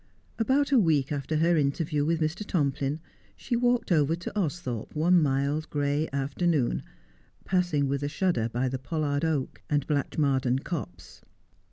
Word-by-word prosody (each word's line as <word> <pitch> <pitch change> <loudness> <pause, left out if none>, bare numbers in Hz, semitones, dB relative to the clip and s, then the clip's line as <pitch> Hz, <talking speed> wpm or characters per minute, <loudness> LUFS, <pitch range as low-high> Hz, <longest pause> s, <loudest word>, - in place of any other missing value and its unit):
About 275 +5 +2
a 265 - +6
week 155 -8 +2
after 145 +1 -2
her 165 +3 +3
interview 150 +1 0
with 165 +2 0
Mr. 155 +6 -1
Tomplin, 145 -5 -1 0.4
she 245 - -2
walked 245 -2 +1
over 155 -1 +3
to 175 - -6
Austhorpe 150 - -3
one 170 +3 +4
mild 140 +2 0
gray 145 +1 0
afternoon, 140 0 0 0.6
passing 175 -7 +1
with 140 0 -1
a 145 - -1
shudder 145 -10 0
by 120 +3 -1
the 130 0 -3
pollard 145 0 -1
oak, 155 -5 -1
and 145 -2 +1
Blatchmardean 135 -3 0
copse. 90 - -6
150 Hz, 150 wpm, -27 LUFS, 140-170 Hz, 0.6 s, a